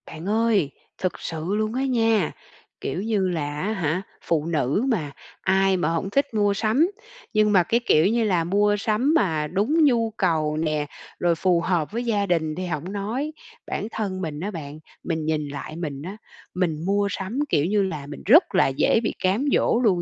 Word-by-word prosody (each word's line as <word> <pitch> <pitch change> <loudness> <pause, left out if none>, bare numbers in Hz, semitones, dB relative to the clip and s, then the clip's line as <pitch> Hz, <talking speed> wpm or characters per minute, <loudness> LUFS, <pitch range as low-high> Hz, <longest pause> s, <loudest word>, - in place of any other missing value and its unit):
Bạn 160 +2 -9
ơi, 215 -8 +2 0.3
thực 185 - -2
sự 160 -1 -5
luôn 215 +1 -1
á 260 +2 -1
nha, 225 - +2 0.5
kiểu 180 - -3
như 210 -4 +1
là 150 -3 -3
á 205 - -1
hả, 175 -3 -1 0.2
phụ 160 -3 0
nữ 160 - 0
mà, 170 - -1 0.3
ai 190 0 +3
mà 165 -3 0
hổng 165 +3 -1
thích 280 +3 0
mua 205 -2 +2
sắm. 225 - +2 0.5
Nhưng 215 -1 +3
mà 190 -4 +5
cái 230 +7 +1
kiểu 155 -5 +4
như 230 +2 +2
là 185 -6 +2
mua 205 +4 +2
sắm 220 +8 +1
mà 160 - +1
đúng 215 - +2
nhu 235 -5 +3
cầu 155 -2 +1
nè, 155 -2 0 0.3
rồi 175 -1 +2
phù 175 0 +2
hợp 170 -3 0
với 235 +3 -2
gia 210 -4 +1
đình 160 -4 0
thì 185 - -4
hổng 170 +1 -4
nói. 225 +9 -3 0.4
Bản 205 - -3
thân 195 -4 -3
mình 155 -4 -4
á 200 +6 -3
bạn, 150 -4 -7 0.2
mình 160 -2 -2
nhìn 155 -1 -1
lại 145 +2 -7
mình 150 -5 -5
á, 190 +7 -7 0.4
mình 170 -3 -1
mua 200 +1 +2
sắm, 195 +8 -4
kiểu 145 - +2
như 200 +3 +2
là, 155 -7 -4
mình 145 - -9
rất 270 - +6
là - - +5
dễ 135 +10 +2
bị 215 - -1
cám 195 +9 +2
dỗ 230 - +2
luôn 185 -6 +3
185 Hz, 200 wpm, -24 LUFS, 160-215 Hz, 0.5 s, rất